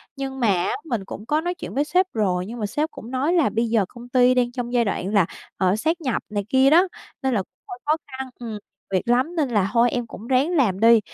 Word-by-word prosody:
nhưng 270 -1 -5
mà 240 - +2
á 185 - +1
mình 235 -10 -3
cũng 210 - -8
có 300 +5 +1
nói 350 +2 -2
chuyện - - -7
với 285 - +2
sếp 360 +5 +2
rồi, 185 -5 0
nhưng 235 +2 -7
mà 210 - -1
sếp 295 +10 -2
cũng 230 - -10
nói 270 +6 +1
là 335 -5 +3
"Bây 230 +1 0
giờ 220 -3 +2
công 240 0 -12
ty 250 0 +5
đang 245 -1 +1
trong 245 -1 -4
giai 240 -1 +3
đoạn 200 0 -2
là, 200 -4 +5 0.3
ờ, 185 0 +2
sát 320 +9 -1
nhập 260 -6 -1
này 205 -1 -2
kia 265 +1 +5
đó, 345 +6 +6 0.4
nên 265 -1 +1
là 210 - +2
cũng - - -32 0.2
hơi 245 - -6
khó 300 - +3 0.2
khăn, 265 0 -5
ừm, 230 -3 -5 0.3
việc 185 +2 0
lắm, 255 +8 +2
nên 300 -5 +1
là 205 -5 +1
thôi 240 0 +4
em 245 -2 -2
cũng 225 +1 -10
ráng 265 +4 +2
làm 210 - +2
đi." 230 +1 +7
245 Hz, 265 wpm, -23 LUFS, 215-270 Hz, 0.4 s, đi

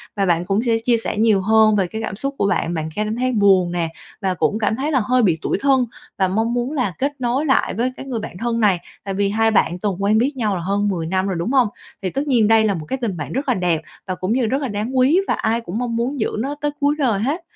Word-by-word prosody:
Và 200 -2 +1
bạn 175 -1 +1
cũng 195 +2 +1
sẽ 230 -2 +3
chia 240 -2 +4
sẻ 225 - -3
nhiều 215 -3 +3
hơn 220 +1 +4
về 195 -3 +1
cái 220 +6 -5
cảm 195 - -4
xúc 275 +6 -4
của 200 - +1
bạn, 170 -3 0
bạn 160 -1 -3
ca 210 - 0
lam 215 +1 -2
thấy 255 +2 0
buồn 195 -5 +4
nè, 170 -2 -1 0.3
và 190 -2 0
cũng 205 +4 0
cảm 215 0 +1
thấy 280 +6 -2
là 270 - +3
hơi 250 +4 +2
bị 175 -6 +3
tủi - - 0
thân 270 -2 +3 0.3
và 190 - +2
mong 220 +5 0
muốn 245 +2 -1
là 250 -10 -1
kết 280 +2 +1
nối 255 +4 0
lại 265 - +2
với 245 +3 -1
cái - - -8
người 250 -4 -3
bạn 215 -4 -7
thân 230 +2 -1
này. 200 -5 +3 0.2
Tại 195 - -4
vì 200 +1 +1
hai 225 +2 +2
bạn 180 -4 +2
từng 195 -1 -2
quen 210 +2 +3
biết 265 +5 0
nhau 215 -5 0
là 175 - -3
hơn 200 +4 0
10 175 -4 -2
năm 190 +2 0
rồi, 190 - -1
đúng 175 +8 -2
hông? 260 -4 +4 0.3
Thì 190 - -1
tất 275 +9 -3
nhiên 235 -6 +3
đây 225 0 +5
là 210 -2 +2
một 160 -4 -5
cái 265 - -3
tình 210 -7 -2
bạn 145 - -5
rất 275 +3 -2
là - - +4
đẹp 175 -5 0 0.3
và 185 - -2
cũng 185 +4 -1
như 250 -1 +1
rất 265 +6 0
là 275 - -1
đáng 220 +4 -3
quý 270 +8 +4
và - - +2
ai 225 +1 0
cũng 210 -2 -5
mong 240 -1 -2
muốn 250 +4 -1
giữ 215 - 0
nó 275 +5 -2
tới 295 0 0
cuối 285 +1 +2
rời 235 -8 +2
hết. 285 - -1
220 Hz, 295 wpm, -20 LUFS, 195-255 Hz, 0.3 s, đây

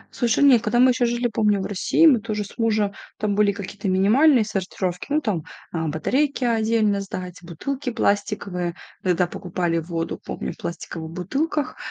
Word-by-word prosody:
Слушай, 240 +2 +2
нет, 260 -5 +7
когда 240 +1 +1
мы 255 +1 +7
еще 245 0 +1
жили, 240 +1 0
помню, 210 -2 +1
в 190 - -3
России, 205 - +2
мы 275 -7 +7
тоже 215 -1 -3
с 200 - -15
мужем, 215 -3 +1 0.2
там 210 -1 -1
были 205 0 +3
какие-то 200 0 -6
минимальные 220 +7 +4
сортировки, 190 -3 -3
ну, 300 +2 +2
там, 195 - -1 0.3
а, 160 -1 -2
батарейки 260 - 0
отдельно 220 -3 +2
сдать, 180 -2 -6
бутылки 250 - -4
пластиковые. 200 -6 -1 0.3
Тогда 180 -1 +2
покупали 175 -1 -2
воду, 165 0 -4
помню, 65 - -5
в - - -21
пластиковых 165 -1 -6
бутылках, 275 - -2
205 Hz, 165 wpm, -23 LUFS, 180-240 Hz, 0.3 s, нет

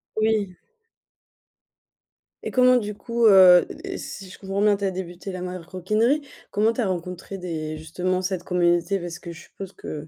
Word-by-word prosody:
Oui. 215 -4 0 1.9
Et - - -4
comment, 255 0 +5
du 210 -3 -3
coup, 235 +2 -1
heu 185 -4 +8 0.2
et - - -5
et - - -4
si 190 -1 -8
je - - -13
comprends 195 0 -3
bien 210 -1 +4
tu 200 - -3
as 190 - 0
débuté 180 0 -7
la 185 - -6
maroquinerie, 185 - -1 0.3
comment 215 +3 +2
tu 230 - -8
as 225 - +1
rencontré 180 +1 -5
des 155 -4 -5
justement 180 +4 -2
cette 185 -2 -3
communauté? 175 +1 +2
Parce 175 0 -7
que 170 - -8
je 155 - -12
suppose 195 +3 -10
que 155 -4 -7
185 Hz, 180 wpm, -24 LUFS, 175-205 Hz, 1.9 s, heu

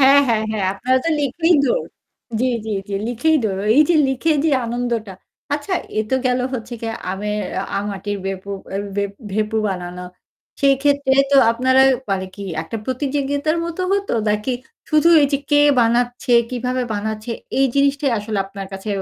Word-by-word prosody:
হ্যাঁ, 275 +1 +7
হ্যাঁ, 220 -2 +2
হ্যাঁ 210 -3 -1
আপনারা 255 +6 +1
তো - - +1
লিখেই 325 +5 +2
দৌড়। - - 0 0.5
জি, 255 - +2 0.2
জি, - - -3 0.2
জ্বী 200 - -3
লিখেই 245 +7 +1
দৌড়, 195 -3 -1 0.2
এই 300 - +8
যে 345 - +4
লিখেই 300 +4 +1
যে 320 - +3 0.2
আনন্দটা। 235 -3 -2 0.4
আচ্ছা, 295 +6 -4 0.3
এ - - +4
তো - - +2
গেল 250 0 +2 0.2
হচ্ছে 240 0 -6
গিয়ে 225 -1 -3 0.2
আমের 210 +2 -3 0.4
আম-আটির 205 0 -4
বেপু 195 +1 -5 0.2
এর 200 - -1
বেপ 200 -1 0 0.2
ভেঁপু 215 +2 -1
বানানো। 180 -1 -5 0.6
সেই 275 -1 +5
ক্ষেত্রে 285 -1 +2 0.2
তো 280 - +5
আপনারা 260 +3 +3 0.3
মানে 190 -1 0
কি 200 - -8 0.2
একটা 165 +7 -6
প্রতিযোগিতার 285 +3 -1
মতো 340 +2 -4
হতো 400 0 0 0.2
নাকি 210 +4 0 0.4
শুধু 310 +1 +4
এই 285 - +5
যে - - +4
কে 290 - +5 0.2
বানাচ্ছে, 245 +2 +1 0.2
কিভাবে 250 +1 -2
বানাচ্ছে 215 +2 -4 0.3
এই 270 - +5
জিনিসটাই 280 0 +2
আসলে 210 0 -3
আপনার 195 0 -8
কাছে 195 +2 -7
245 Hz, 165 wpm, -20 LUFS, 210-280 Hz, 0.6 s, এই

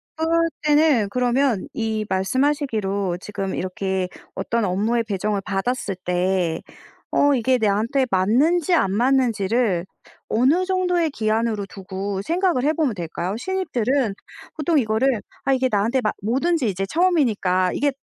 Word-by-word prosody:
그럴 330 +1 +1
때는 295 -7 +4
그러면 250 -2 +1
이 220 -2 -2
말씀 190 +8 +1
하시기로 205 - -1
지금 195 -1 -4
이렇게 185 0 -2 0.3
어떤 230 0 -1
업무에 215 +6 0
배정을 205 -1 -2
받았을 200 +1 -2
때 180 -2 0 0.5
어 285 0 +4
이게 255 0 +2
나한테 220 +5 +1
맞는지 290 - +3
안 195 - +2
맞는지를 230 -5 +1 0.5
어느 270 +11 +3
정도의 360 -3 +1
기한으로 220 -4 -1
두고 195 0 -5
생각을 340 - 0
해 300 +2 +2
보면 300 -7 0
될까요? 175 +2 -4
신입들은 260 - -1 0.4
보통 315 0 +1
이거를 235 +1 +1 0.2
아 270 0 +2
이게 260 0 +1
나한테 225 +6 +1
맞 215 - 0
뭐든지 265 - +1
이제 195 0 -2
처음이니까 220 - +2
이게 285 -1 0
230 Hz, 310 characters per minute, -22 LUFS, 195-280 Hz, 0.5 s, 때는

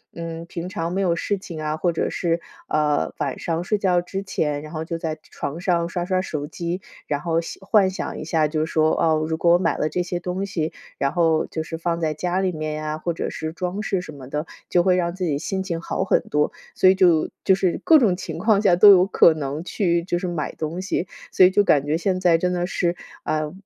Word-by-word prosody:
嗯， 165 0 -6
平 170 +1 -6
常 165 -2 -3
没 195 - -1
有 175 -3 +2
事 205 +3 -1
情 170 -5 -8
啊， 155 0 -2
或 175 +1 +1
者 165 - -1
是， 170 -1 0 0.3
呃， 150 -1 +1
晚 140 -3 -3
上 165 0 -2
睡 210 +2 0
觉 180 -3 +3
之 190 +2 -4
前， 150 -6 -2
然 155 +1 -10
后 160 -1 -4
就 165 0 -4
在 155 -1 -3
床 150 +3 -6
上 170 -3 0
刷 175 0 -2
刷 185 0 +1
手 150 -5 -4
机， 170 +4 -4 0.3
然 145 - -1
后 165 0 0
想 165 - -8
幻 200 -3 +4
想 190 - -5
一 - - -5
下 155 -1 +1
就 155 +1 -1
说： 155 -1 +2
“哦， 155 -1 +2
如 160 0 -1
果 170 +1 +4
我 - - +6
买 165 -4 0
了 155 - 0
这 180 +3 -1
些 175 0 -3
东 180 +2 -3
西， 165 -5 -2 0.3
然 140 0 0
后 165 -2 +2
就 160 - -4
是 165 0 -6
放 170 0 -1
在 160 -2 0
家 180 +4 -1
里 185 -1 +1
面 155 -1 -4
呀， 155 0 -4
或 170 - -2
者 - - -3
是 160 0 -5
装 180 +4 -3
饰 195 -4 -1
什 180 - -9
么 140 -4 -11
的， 150 +4 -3 0.2
就 175 - +3
会 185 0 +4
让 175 -1 -1
自 185 - -2
己 145 -4 0
心 190 +4 -2
情 170 -3 -3
好 - - -2
很 - - +2
多。” 150 0 +1 0.2
所 185 - +4
以 190 - +8
就 175 -4 +3
就 190 - +5
是 185 -2 0
各 320 - +7
种 215 -10 +3
情 160 -3 -6
况 205 +2 +3
下， 195 -5 +4
都 205 +3 +9
有 185 -1 +6
可 170 - +5
能 150 +1 -4
去 170 -3 0
就 175 -1 -1
是 185 - -3
买 170 -4 -3
东 160 +3 -4
西， 185 -1 -2 0.2
所 - - +5
以 180 - +8
就 205 +2 +3
感 145 -7 +3
觉 155 +2 +1
现 185 +1 0
在 175 -2 +4
真 180 +2 0
的 175 0 -1
是， 175 -2 0 0.3
啊， 155 -1 -1
170 Hz, 270 characters per minute, -23 LUFS, 155-185 Hz, 0.3 s, 都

